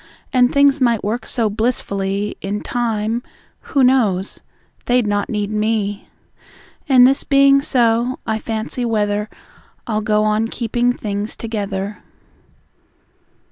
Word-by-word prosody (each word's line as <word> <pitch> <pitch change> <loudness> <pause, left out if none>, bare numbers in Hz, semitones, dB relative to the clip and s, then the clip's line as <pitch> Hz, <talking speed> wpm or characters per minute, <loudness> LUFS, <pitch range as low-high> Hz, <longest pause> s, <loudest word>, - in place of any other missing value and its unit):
And 250 -1 +4
things 280 0 +3
might 235 -4 +2
work 220 +3 -3
so 230 -3 0
blissfully, 205 -2 -2
In 200 +2 -3
time 230 -1 -1 0.4
who 275 -3 +1
knows? 215 -8 +2 0.5
they'd 245 -1 +3
not 205 -1 -1
need 210 -1 -2
me! 210 -1 -1 0.8
And 255 -2 +7
this 270 +2 +3
being 275 -1 +5
so, 240 -2 +1
I 220 0 -1
fancy 225 +3 -3
whether 210 -2 0 0.6
I'll 215 -3 -1
go 210 0 +1
on 215 +1 +1
keeping 240 +1 0
things 210 -2 -4
together. 205 -2 -4
220 Hz, 120 wpm, -19 LUFS, 210-245 Hz, 0.8 s, And